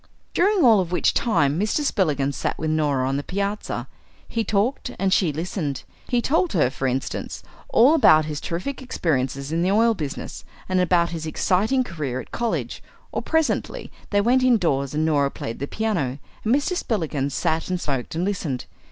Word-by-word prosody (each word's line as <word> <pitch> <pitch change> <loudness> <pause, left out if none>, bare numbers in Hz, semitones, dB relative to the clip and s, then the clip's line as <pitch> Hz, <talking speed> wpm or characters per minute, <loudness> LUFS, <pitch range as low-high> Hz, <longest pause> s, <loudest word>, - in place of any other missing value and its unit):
During 390 0 +3
all 225 -4 +7
of 180 -2 -2
which 180 - +2
time 150 - +2
Mr. 215 +8 +1
Spillikins 145 - 0
sat - - -2
with 155 0 -1
Norah 145 -4 +1
on 135 +1 0
the 145 - -3
piazza. 200 +4 -3 0.4
He 230 - -1
talked 220 +6 0
and 190 -1 +1
she 175 -6 +3
listened. 155 -3 -3 0.2
He 240 -1 +1
told 335 +3 +1
her, 145 -8 +2
for 135 - -2
instance, 130 +1 -3 0.3
all 255 +7 +6
about 155 - +6
his 150 -2 -4
terrific 185 +12 -4
experiences 140 - -1
in 165 +1 0
the 180 - +2
oil 225 +3 +4
business, 150 -9 -6 0.2
and 185 0 +1
about 170 -1 +2
his 160 -2 -4
exciting 210 +11 +1
career 150 - -4
at - - -10
college; 235 -1 -2 0.3
or - - -2
presently 320 -1 -1 0.2
they 205 -1 +2
went 250 +5 +3
indoors 165 - +2
and 155 +1 +1
Norah 145 -3 +2
played 115 -4 -6
the 140 - -3
piano 175 - -1 0.3
and 225 +4 +3
Mr. 290 +6 0
Spillikins 155 - -2
sat 160 +2 0
and 180 -1 -1
smoked 135 -3 -3
and 170 +3 0
listened. 165 -10 -2
175 Hz, 180 wpm, -23 LUFS, 145-220 Hz, 0.4 s, all